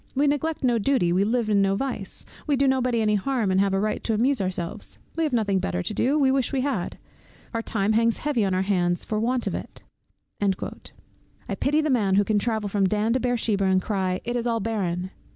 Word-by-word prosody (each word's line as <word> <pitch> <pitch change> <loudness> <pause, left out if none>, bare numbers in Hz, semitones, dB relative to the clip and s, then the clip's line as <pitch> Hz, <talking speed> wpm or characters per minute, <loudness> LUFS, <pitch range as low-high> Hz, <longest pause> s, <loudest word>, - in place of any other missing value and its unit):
We 280 +2 +3
neglect 295 +2 0
no 240 -3 +3
duty, 205 -7 +2
we 190 +2 +3
live 230 +2 0
in 205 -2 +3
no 195 0 +2
vice, 230 -4 -2 0.2
we 290 - +3
do 275 +1 +2
nobody 255 -3 +1
any 210 0 +2
harm, 215 0 0
and 185 - +2
have 195 0 +2
a 195 - +1
right 215 +1 -1
to 225 - +1
amuse 255 +2 +2
ourselves. 180 -3 -4 0.2
We 330 - 0
have 300 - -1
nothing 210 -5 +1
better 180 -1 -2
to 200 - -3
do, 270 +7 +1
we 270 -3 +3
wish 265 -2 +1
we 270 -2 0
had; 255 -10 -2 0.6
our 230 - -1
time 215 -2 0
hangs 230 +1 +2
heavy 275 -6 0
on 190 -2 +1
our 185 - +1
hands 175 -3 +1
for 215 - -1
want 245 +2 0
of - - -2
it." - - -7 0.6
I 195 -2 -6
pity 295 +2 +1
the 305 -1 0
man 205 -7 +2
who 205 - +4
can 210 0 +1
travel 220 -1 -1
from 200 -1 +1
Dan 215 +3 +1
to 260 - +1
Beer 245 -1 0
sheba, 205 -3 +1
and 190 0 +3
cry 185 -2 -1
"It 240 +1 -3
is 240 0 -1
all 230 -1 +1
barren." 185 -4 -2
220 Hz, 235 wpm, -25 LUFS, 195-255 Hz, 0.6 s, who